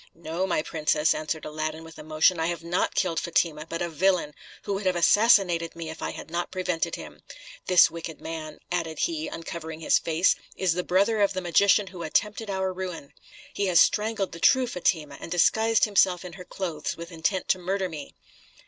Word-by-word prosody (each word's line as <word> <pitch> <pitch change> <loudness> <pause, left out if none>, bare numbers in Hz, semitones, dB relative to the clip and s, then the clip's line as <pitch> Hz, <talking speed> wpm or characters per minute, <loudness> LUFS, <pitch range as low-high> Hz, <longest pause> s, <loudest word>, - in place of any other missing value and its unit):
"No, 170 +3 -3
my 165 -4 0
princess," 155 -1 +1
answered 155 0 -4
Aladdin 155 +1 -4
with 160 -1 -13
emotion, 155 +3 +2
"I 160 - +1
have 170 -2 -3
not 170 +2 -1
killed 170 -4 +1
Fatima, 165 -2 -1
but 165 +1 -3
a - - -1
villain, 170 -1 +1 0.3
who 200 - -2
would 195 0 -2
have 185 - +2
assassinated 175 -3 +4
me 165 -1 -6
if 160 - -11
I - - -2
had - - -9
not 175 0 -2
prevented 180 -3 -2
him. - - -11 0.5
This 180 -1 +6
wicked 165 -1 -7
man," 160 -1 -7
added 165 -3 -2
he, 325 -2 -1
uncovering 160 -1 -7
his - - +3
face, 165 +2 +2 0.2
"is 185 -3 +1
the 180 +1 -2
brother 200 +5 +2
of 200 - +3
the 185 - -2
magician 200 +4 +3
who 185 -2 -10
attempted 210 +6 -1
our 190 -1 -1
ruin. 180 -6 -6 0.4
He 200 - -1
has 175 -2 +4
strangled 210 -2 +2
the 165 - -9
true 260 +8 +4
Fatima, 165 - -1
and - - -8
disguised 220 +6 +3
himself 190 -4 +2
in 180 - -8
her 180 -1 -10
clothes 170 -5 -4
with 170 +1 -8
intent 170 +3 -1
to 185 - +2
murder 190 +1 -1
me." 155 -5 -9
175 Hz, 195 wpm, -26 LUFS, 160-190 Hz, 0.5 s, This